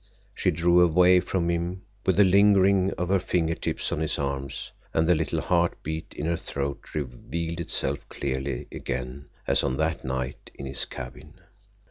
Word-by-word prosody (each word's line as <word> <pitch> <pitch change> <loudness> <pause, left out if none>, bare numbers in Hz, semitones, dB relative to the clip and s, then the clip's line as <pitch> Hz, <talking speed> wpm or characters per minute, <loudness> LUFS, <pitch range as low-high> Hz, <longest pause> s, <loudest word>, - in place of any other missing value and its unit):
She 95 - +1
drew 85 +1 +4
away 90 +2 +6
from 90 -1 -1
him, 85 +2 -2 0.2
with 95 +1 +3
a - - +9
lingering 100 0 +5
of 90 0 -2
her 100 0 +4
finger 85 -3 0
tips - - -2
on - - -1
his 80 -1 -1
arm, 70 -1 -2 0.5
and 80 0 +3
the 90 - +6
little 80 -1 0
heart 85 -1 +1
beat 80 +1 -5
in 75 - -4
her 85 0 +1
throat 70 -3 -5
revealed 80 +5 -4
itself 85 - -2
clearly 65 -2 -3
again 65 +3 -5 0.2
as - - +2
on 65 - 0
that 80 +1 0
night 65 0 -4
in 70 - -7
his 65 0 -2
cabin. 65 0 -9
80 Hz, 170 wpm, -26 LUFS, 70-90 Hz, 0.5 s, a